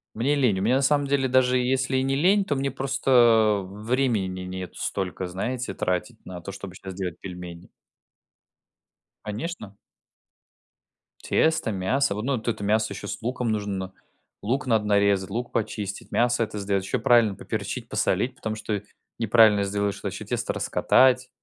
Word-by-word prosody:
Мне 135 +6 +1
лень. 125 -9 +2
У - - -2
меня, 115 +6 +3
на 135 - +2
самом 145 +1 +2
деле, 135 -1 +1
даже 130 0 +3
если 130 +1 0
и 130 - +1
не 135 0 0
лень, 195 +7 +4
то 150 -7 -1
мне 135 0 -1
просто 120 -6 +3
времени 110 +1 0
не - - -6
нет 90 0 -6
столько, 95 -1 -3
знаете, 120 +8 -3
тратить 90 +6 -3
на 90 -1 -8
то, 100 - -7
чтобы 95 -1 -9
щас 95 +1 -8
делать 90 -2 -4
пельмени. 90 -2 -9 1.5
Конечно. 105 - -6 1.5
Тесто, 160 -7 +2
мясо, 100 +5 0
во 105 - -3
ну, 135 0 0
т 115 - -1
это 100 - -7
мясо 110 +1 +1
ещё 100 +1 -7
с - - -5
луком 125 0 -2
нужно. 100 -3 -3 0.5
Лук 130 +8 -1
надо 110 -4 +2
нарезать, 100 -2 +2
лук 120 +4 -4
почистить, 105 -3 -4
мясо 120 0 +2
это 105 - -5
сделать, 100 -1 -1
ещё 115 +5 -2
правильно 115 -3 +4
поперчить, - - -5
посолить, - - 0
потому 110 -1 -4
что 105 -2 -3 0.4
неправильно 110 -2 +5
сделаешь, 100 0 -1
то - - -3
ещё - - -6
тесто - - -2
раскатать, 130 -1 +3
110 Hz, 165 wpm, -25 LUFS, 100-130 Hz, 1.5 s, неправильно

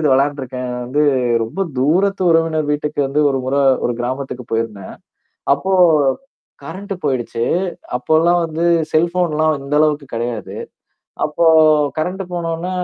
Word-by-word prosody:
இது 155 - +1
விளையாண்டுருக்கேன். 130 -2 -1
வந்து 145 +5 0 0.4
ரொம்ப 115 +13 -5 0.2
தூரத்து 185 +9 +1
உறவினர் 165 -2 +2
வீட்டுக்கு 150 0 -2
வந்து 140 +3 0
ஒரு 135 - 0
முற, 130 +2 -1 0.3
ஒரு 120 - +1
கிராமத்துக்கு 130 0 -4
போயிருந்தேன். 110 -4 -3 0.6
அப்போ. 190 +7 -3 0.9
கரண்ட் 200 +1 -6
போயிடுச்சு. 125 -4 -1 0.5
அப்போல்லாம் 160 +7 +2
வந்து 165 +1 -2 0.3
செல்போன்லாம் 155 -2 +1
இந்த 140 +1 -9
அளவுக்கு 150 -2 +1
கெடையாது. 115 -3 -4 0.7
அப்போ 155 +3 0 0.5
கரண்ட்டு 185 +5 -2
போனோன்ன, 170 +1 -3
150 Hz, 115 wpm, -18 LUFS, 130-165 Hz, 0.9 s, உறவினர்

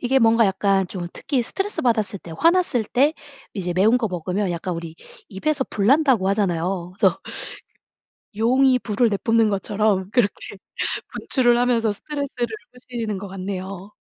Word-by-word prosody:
이게 260 +2 +2
뭔가 230 -1 +5
약간 195 0 +1
좀 175 -3 -5
특히 270 -4 -1
스트레스 390 - -3
받았을 220 -4 +1
때, 170 -2 -11
화났을 335 -9 +3
때 285 +8 +2 0.4
이제 180 -4 -2
매운 210 +7 +4
거 225 - 0
먹으면 180 +2 -2
약간 175 +1 -3
우리 165 -1 -7 0.3
"입에서 265 +8 -1
불난다."고 240 -2 +3
하잖아요. 180 -2 -1
그래서 190 -3 +3 1.2
용이 255 +3 +4
불을 230 +1 +1
내뿜는 225 +2 +2
것처럼 200 -1 0
그렇게 210 -4 -1 0.6
분출을 240 -3 +2
하면서 235 -3 +2
스트레스를 280 +1 -4 0.3
푸시는 235 -5 -5
것 200 +1 -7
같네요. 190 +1 -6
215 Hz, 335 characters per minute, -22 LUFS, 190-245 Hz, 1.2 s, 뭔가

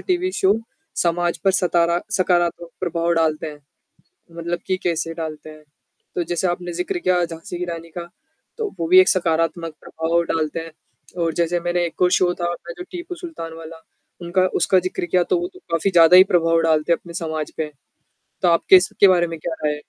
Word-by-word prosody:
TV 365 0 0
show 190 +2 +3 0.4
समाज 175 0 0
पर 195 - +5
सतारा 170 -2 +2 0.2
सकारात्मक 175 -2 +1
प्रभाव 170 -1 0
डालते 160 -1 0
हैं? 150 -1 -9 0.8
मतलब 170 +1 -3
कि 185 - +1
कैसे 165 -1 -1
डालते 155 -2 -6
हैं? 155 0 -13 0.5
तो 175 - 0
जैसे 175 +2 -1
आपने 175 0 -3
ज़िक्र 180 +1 -2
किया 180 0 +2
झाँसी 165 +1 -8
की 180 - -3
रानी 170 -1 -6
का, 170 - -5 0.5
तो 440 -3 -2
वो 165 - -1
भी 185 +2 +8
एक 185 - +6
सकारात्मक 165 -1 0
प्रभाव 165 +1 -1
डालता 160 0 -1
है 165 0 -9 0.5
और 165 -1 0
जैसे 170 +1 0
मैंने 175 0 0
एक 170 - -8
और 180 - +4
शो 180 -1 +3
था - - 0
अपना 170 0 -9
जो 360 - -6
टीपू 355 0 -6
सुल्तान 325 - -8
वाला 165 0 -10 0.4
उनका 175 +2 +1
उसका 185 +2 +3
ज़िक्र 185 -1 -3
किया, 175 +1 +2
तो 355 - +1
वो 355 - -2
तो 370 - -14
काफ़ी 165 +4 +1
ज़्यादा 170 0 +7
ही 185 - +10
प्रभाव 165 -1 +3
डालते 160 0 +1
हैं - - 0
अपने 170 - -11
समाज 160 -3 -4
पे, 155 -1 -3 0.7
तो 180 - +4
आपकी 170 +2 +6
इसके 190 +2 +4
बारे 175 -2 +4
में 165 -1 -7
क्या 160 +1 -4
राय 150 - +2
है? 150 - -5
170 Hz, 200 wpm, -21 LUFS, 165-180 Hz, 0.8 s, ही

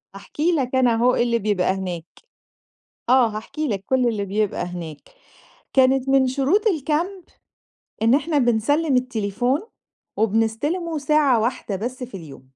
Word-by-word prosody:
هاحكي 300 - -2
لَك 265 -5 -1
أنا 250 -3 +3
أهو 245 +2 +3
إيه - - +2
اللي 235 -1 +1
بيبقى 195 -3 +1
هناك. 180 -3 -5 1.0
آه، 255 -1 +5
هاحكي 225 +8 -5
لَك 195 -3 -3
كل 255 -2 +2
اللي 210 -3 -2
بيبقى 205 +1 -1
هناك. 170 -4 -7 0.8
كانت 265 0 +3
من 270 -1 +4
شروط 280 +10 +1
الcamp 335 +3 -2 0.7
إن 230 +4 +4
إحنا، 305 0 0
بنسلّم 260 +5 +2
التليفون 245 - -1 0.6
وبنستِلمُه 225 - 0
ساعة 285 -4 +3
واحدة 230 -3 -2
بس 250 +5 -5
في 235 -6 -7
اليوم. 145 -6 -12
250 Hz, 140 wpm, -22 LUFS, 215-285 Hz, 1.0 s, آه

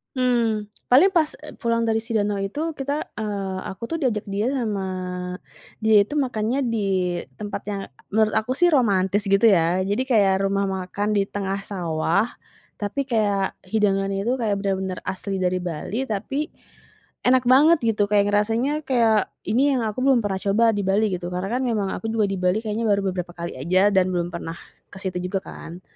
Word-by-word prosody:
Mmm, 230 -5 +1 0.2
paling 295 +11 +6
pas 325 -5 +1
e - - -8
pulang 230 0 +1
dari 225 -1 +1
si 225 0 -4
danau 205 -1 +1
itu 295 +12 -2
kita, 280 +2 -3
eee, 200 -3 -3
aku 190 - -9
tuh 330 - 0
diajak 230 -7 0
dia 200 +3 -1
sama 225 -8 -1 1.0
dia 220 0 +5
itu - - -8
makannya 250 -2 0
di 225 -3 -1 0.5
tempat 205 -1 -5
yang 200 -1 -3 0.3
menurut 215 0 +3
aku 245 +4 -3
sih 350 0 +4
romantis, 205 - +2
gitu 195 +3 +4
ya. 180 -3 +4
Jadi 205 +5 0
kayak 200 -6 +3
rumah 195 0 +1
makan 190 +2 -2
di 200 - +2
tengah 195 -1 -3
sawah 175 +1 0 0.5
tapi 265 +7 -3
kayak 205 -4 0
hidangannya 195 -1 +1
tuh 240 +5 0
kayak 225 -4 0
bener-bener 190 -2 -2
asli 190 0 -4
dari 180 0 +1
Bali, 180 +8 -3
tapi 265 +7 -2 0.8
enak 255 0 +4
banget 300 +6 +6
gitu, 215 -3 +2
kayak 205 -1 +3
ngerasanya, 230 +9 +1
kayak 230 -5 +3 0.2
ini 275 +6 +3
yang 250 - 0
aku 215 +3 -4
belum 265 -3 +4
pernah 195 -2 -1
coba 215 +3 +3
di 205 - 0
Bali, 205 +3 +2
gitu. 175 -1 -3
Karena 180 +2 -3
kan - - -1
memang 215 -5 0
aku - - -7
juga 220 -2 +2
di 195 - -2
Bali 180 +4 +1
kayaknya 220 +1 -2
baru 200 -1 +3
beberapa 180 -1 -5
kali 170 -5 -6
aja 185 +8 +3
dan 190 -2 +3
belum 175 -1 -1
pernah 165 -1 -5 0.4
ke - - -9
situ 185 -2 -3
juga, 190 +1 -2
kan. 170 +2 -9
210 Hz, 185 wpm, -23 LUFS, 195-235 Hz, 1.0 s, paling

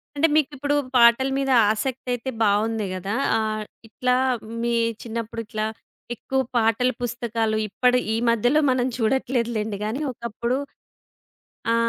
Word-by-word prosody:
అంటే, 300 +3 +4
మీకిప్పుడు 285 -1 +1 0.2
పాటల 235 +2 +6
మీద 270 -1 0 0.2
ఆసక్తయితే 245 +2 -3
బావుంది 215 +1 +1
గదా! 195 +4 -3 0.2
ఆహ్, 215 -1 -1 0.2
ఇట్లా 250 +2 0 0.5
మీ 235 0 0 0.3
చిన్నప్పుడిట్లా 230 -1 -4 0.5
ఎక్కువ 265 +3 -1 0.2
పాటల 225 +2 +3
పుస్తకాలు 230 -2 -1
ఇప్పడి 250 +4 +2
ఈ - - +1
మధ్యలో 245 +6 +3
మనం 255 0 +1
చూడట్లేదులెండి 230 -3 0
గాని 225 +7 -3
ఒకప్పుడు 235 +1 -3 1.2
ఆ! - - +3
235 Hz, 110 wpm, -23 LUFS, 220-255 Hz, 1.2 s, పాటల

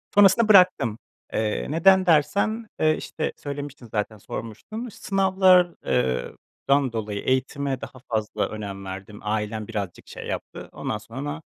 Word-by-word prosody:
Sonrasında 205 +3 +6
bıraktım. 180 - +5 0.4
Eee, 110 -1 -1
neden 190 +4 +5
dersen, 200 +7 +2
eee, 155 0 +3
işte, 155 - -4
söylemiştim 140 -3 -7
zaten, 110 0 -2
sormuştun. 120 - -7
İş 215 - -11
sınavlar 190 -2 +4
eee, 65 -1 0 0.4
dan 140 -3 +3
dolayı 105 -2 -3
eğitime 130 +1 0
daha 130 - -9
fazla 110 -2 -1
önem 100 -2 -6
verdim. 95 +2 -8
Ailem 105 0 -2
birazcık 100 -6 -5
şey - - -8
yaptı. - - -6
Ondan 110 - -3
sonra 135 +9 -6
135 Hz, 135 wpm, -24 LUFS, -, 0.4 s, Sonrasında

